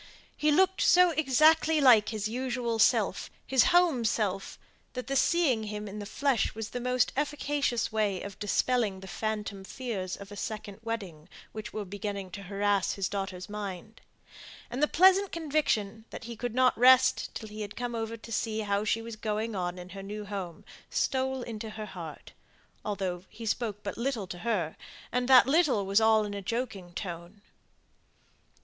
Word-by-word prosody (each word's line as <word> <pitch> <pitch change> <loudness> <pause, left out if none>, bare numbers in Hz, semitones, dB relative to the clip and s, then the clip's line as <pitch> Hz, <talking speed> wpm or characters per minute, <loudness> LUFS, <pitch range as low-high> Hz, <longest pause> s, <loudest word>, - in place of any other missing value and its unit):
He 305 - +1
looked 380 +4 +3
so 360 0 +6
exactly 310 +2 +4
like 235 -7 +6
his 215 -2 -2
usual 245 -1 -2
self, - - +2 0.2
his 265 -2 +4
home 345 -8 +4
self, 200 -3 -1 0.4
that 250 -1 -5
the 275 +2 -2
seeing 270 -7 +2
him 210 0 -5
in 205 +1 -7
the 205 - -6
flesh 265 -2 0
was 225 0 -5
the 245 - -3
most 250 0 +1
efficacious 290 -4 -1
way 210 -3 0
of 200 -1 -8
dispelling 210 -1 +1
the 190 - -9
phantom 210 -1 -3
fears 195 -4 -4
of 200 0 -11
a - - -7
second 210 -1 -6
wedding, 195 -8 -6 0.2
which 215 0 -7
were 215 -1 -4
beginning 200 0 -5
to 200 - -7
harass 200 0 0
his 195 -2 -1
daughter's 190 -2 -4
mind; 205 0 -7 0.7
and 250 +4 -3
the 300 - +5
pleasant 380 +4 +5
conviction 275 -10 -1
that - - -8
he 235 +1 -7
could 240 +1 -4
not 255 0 +4
rest 255 +2 +5
till 220 - -6
he 215 +1 -7
had 205 0 -6
come 245 -1 -3
over 225 0 -3
to 230 +1 -12
see 220 0 -1
how 200 -1 0
she 225 +1 0
was 230 -1 -7
going 215 +1 -2
on 180 -1 -2
in 180 0 -9
her 195 +2 -8
new 210 +2 -6
home, 190 -5 -6 0.2
stole 265 -1 0
into 220 -2 -6
her 215 0 -6
heart, 170 -6 -9 0.5
although 190 -4 -3
he 225 +1 -9
spoke 210 -2 -2
but 200 +2 -5
little 235 -5 -1
to 180 -1 -8
her, 190 -7 -1 0.4
and 250 0 0
that 260 -2 +8
little 270 - +3
was 200 +3 +3
all 220 -1 +4
in 205 - -5
a 200 - -4
joking 200 -4 -4
tone. 175 +3 -7
220 Hz, 180 wpm, -29 LUFS, 200-250 Hz, 0.7 s, that